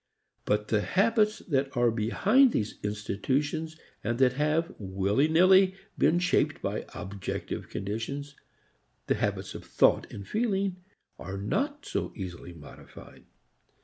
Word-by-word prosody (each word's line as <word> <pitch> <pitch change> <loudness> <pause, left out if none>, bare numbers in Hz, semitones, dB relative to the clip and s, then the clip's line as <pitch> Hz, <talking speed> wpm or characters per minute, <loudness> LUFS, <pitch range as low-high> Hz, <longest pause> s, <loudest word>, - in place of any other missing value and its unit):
But 105 0 0
the 105 -2 +2
habits 215 - +2
that 135 -4 0
are 120 -1 +4
behind 205 - +3
these 105 -1 -2
institutions 135 +10 -2 0.3
and 120 +2 -1
that 130 -1 +4
have, 155 +5 0
willy 100 +7 +1
nilly, 185 +3 +5 0.2
been 170 - +3
shaped 180 0 +1
by - - -3
objective 95 -1 -5
conditions, 115 +9 -4 0.7
the - - +2
habits - - -2
of - - -8
thought - - +2
and 100 -1 -8
feeling, 200 -4 0 0.4
are 95 +2 -6
not 285 - -2
so - - -3
easily 90 -3 -7
modified. 80 -4 -14
140 Hz, 125 wpm, -28 LUFS, -, 0.7 s, nilly